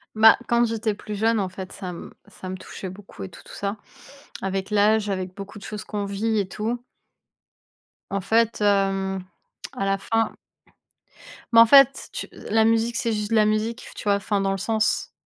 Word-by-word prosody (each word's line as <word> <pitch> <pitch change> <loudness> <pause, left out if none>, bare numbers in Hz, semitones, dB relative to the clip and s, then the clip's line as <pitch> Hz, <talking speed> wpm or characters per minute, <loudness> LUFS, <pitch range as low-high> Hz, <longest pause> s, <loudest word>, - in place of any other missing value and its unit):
Ben 220 +1 +8
quand 235 0 +3
j'étais 225 -2 0
plus 210 +1 -7
jeune, 225 +1 +2
en 190 - -2
fait, 185 0 -8
ça 185 -3 -6
m 175 - -8
ça 185 - -10
me 185 - -4
touchait 185 +1 -8
beaucoup 195 +2 -10
et 190 - -6
tout, - - -14
tout - - -13
ça. 200 +1 -3 0.7
Avec 195 0 -2
l'âge, 210 0 +3
avec 185 -1 -3
beaucoup 200 +1 -8
de - - -14
choses 210 -1 -6
qu'on 205 -1 -4
vit 210 +2 0
et 195 - -1
tout 220 +5 -3 1.3
en 195 0 -1
fait 225 +3 +2
hem, 195 -2 +1 0.5
à 195 - -2
la 195 0 +1
fin 225 +2 -1 1.2
Mais 230 - +8
en 230 - +10
fait, 275 +2 +6
tu - - -4
la 220 +1 +1
musique, 230 +1 +2
c'est 230 -1 0
juste 210 +1 -3
la 215 -1 +5
musique, 215 +3 -1
tu - - -7
vois? 205 -1 +4
Enfin 200 0 -1
dans 195 0 +1
le 195 - -1
sens 220 +2 0
210 Hz, 195 wpm, -24 LUFS, 195-225 Hz, 1.3 s, en